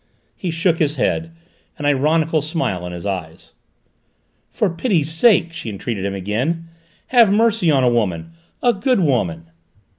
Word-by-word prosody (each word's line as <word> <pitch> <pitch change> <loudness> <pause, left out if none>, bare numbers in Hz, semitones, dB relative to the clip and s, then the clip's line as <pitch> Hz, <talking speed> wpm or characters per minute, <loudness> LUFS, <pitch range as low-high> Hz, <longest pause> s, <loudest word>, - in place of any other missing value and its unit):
He 185 - -4
shook 165 +1 +1
his 150 -1 +1
head, 160 +4 -1 0.5
an 145 - -5
ironical 155 +3 +2
smile 150 - -2
in - - -6
his 90 +2 -8
eyes. 80 -4 -6 1.0
"For 215 - 0
pity's 170 - 0
sake," 170 -1 +3
she 165 -8 -6
entreated 100 0 -4
him 100 0 -2
again, 125 - -2 0.4
"have 235 -5 +5
mercy 220 -3 +2
on 135 -4 +3
a - - +4
woman 90 -8 -1 0.3
a 245 -1 +4
good 220 +2 +1
woman!" 85 - -1
150 Hz, 150 wpm, -19 LUFS, -, 1.0 s, have